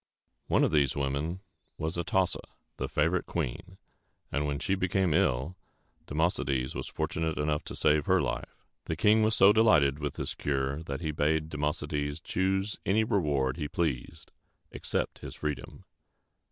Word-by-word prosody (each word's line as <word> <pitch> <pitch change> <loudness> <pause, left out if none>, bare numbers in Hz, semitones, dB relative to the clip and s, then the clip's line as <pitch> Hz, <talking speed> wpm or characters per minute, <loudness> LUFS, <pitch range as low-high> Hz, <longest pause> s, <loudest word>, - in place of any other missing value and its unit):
One - - +3
of - - +3
these 70 -4 +3
women 70 +6 -2 0.4
was 80 +2 -2
A 85 - -1
tos´sa, 95 +2 +1 0.4
the - - -3
favorite 85 +2 +1
queen; 85 +4 -4 0.5
and 75 +1 0
when 70 -1 -1
she 95 - -1
became 95 -2 +1
ill, 80 -2 +1 0.5
Democedes 70 -5 0
was - - -4
fortunate 80 -1 -2
enough 75 0 0
to - - -6
save 75 -1 +3
her - - +4
life. - - -4 0.2
The 80 - -2
king 105 +6 +4
was 110 0 +3
so 100 +1 +7
delighted 75 -11 +4
with 75 -2 -3
this - - -3
cure, 70 +1 -1
that 70 +1 -4
he 80 -2 -1
bade 75 +1 +1
Democedes 75 0 -2
choose 95 +2 0
any 110 +3 +3
reward 75 - +1
he 75 -3 -2
pleased 75 -6 -3 0.4
except - - -2
his - - -8
freedom. 75 -2 -5
75 Hz, 155 wpm, -29 LUFS, 70-90 Hz, 0.5 s, so